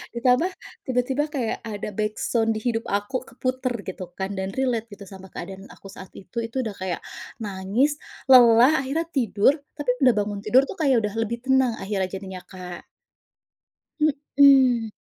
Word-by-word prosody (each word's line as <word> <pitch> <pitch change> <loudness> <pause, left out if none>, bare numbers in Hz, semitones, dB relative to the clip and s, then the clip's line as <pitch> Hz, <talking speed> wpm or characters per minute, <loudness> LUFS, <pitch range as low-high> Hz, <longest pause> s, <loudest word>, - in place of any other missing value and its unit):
Ditambah 250 +7 +3 0.4
tiba-tiba 260 +2 0
kayak 240 -5 -1
ada 210 -1 -5
backsound 225 +1 0
di - - -2
hidup 230 -1 -1
aku 205 +6 -2
keputer 255 0 -2
gitu 185 0 -5
kan 190 +1 -3
dan 190 +1 -3
relate 245 -4 -1
gitu 200 - -11
sama 190 -1 -11
keadaan 190 +2 -8
aku 195 - -14
saat 190 -1 -11
itu. 190 +3 -13
Itu 255 +3 -3
udah 215 -3 -5
kayak 185 -2 -3 0.4
nangis, 210 +9 0 0.3
lelah, 245 +1 +8
akhirnya 300 +5 -1
tidur. 240 -3 +2 0.2
Tapi 290 -3 -4 0.2
udah 250 - +6
bangun 205 -1 -2
tidur 250 +5 +6
tuh - - -7
kayak 265 -6 +3
udah 210 -1 -2
lebih 235 +2 -3
tenang 265 -2 +3
akhirnya 195 -2 -1
jadinya, 190 -1 -7
Kak. 180 -2 -9 1.5
Mhm. 260 -5 +6
225 Hz, 155 wpm, -24 LUFS, 200-255 Hz, 1.5 s, lelah